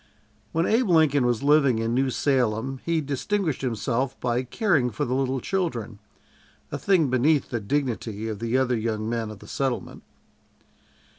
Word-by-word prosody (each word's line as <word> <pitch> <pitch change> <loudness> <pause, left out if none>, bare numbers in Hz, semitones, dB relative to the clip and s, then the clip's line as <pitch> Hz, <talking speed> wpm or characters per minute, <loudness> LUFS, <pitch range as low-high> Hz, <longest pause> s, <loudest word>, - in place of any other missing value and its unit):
When 165 +1 +1
Abe 225 0 +2
Lincoln 150 -6 +4
was 120 -1 0
living 140 -4 +4
in 115 +1 -1
New 130 +2 +2
Salem 130 0 0
he 165 -1 0
distinguished 155 +3 -1
himself 125 +1 -1
by 120 0 0
caring 135 - +1
for 110 - -2
the 125 - -2
little 135 0 0
children 125 - -3 0.7
a - - -3
thing 170 -9 +2
beneath 140 +3 +2
the 120 - -1
dignity 115 -3 -2
of 110 -2 -4
the 115 +2 0
other 130 -2 +2
young 110 -1 -2
men 115 -1 -2
of 110 - -8
the - - -14
settlement. 135 -3 -3
130 Hz, 160 wpm, -25 LUFS, 115-145 Hz, 0.7 s, Lincoln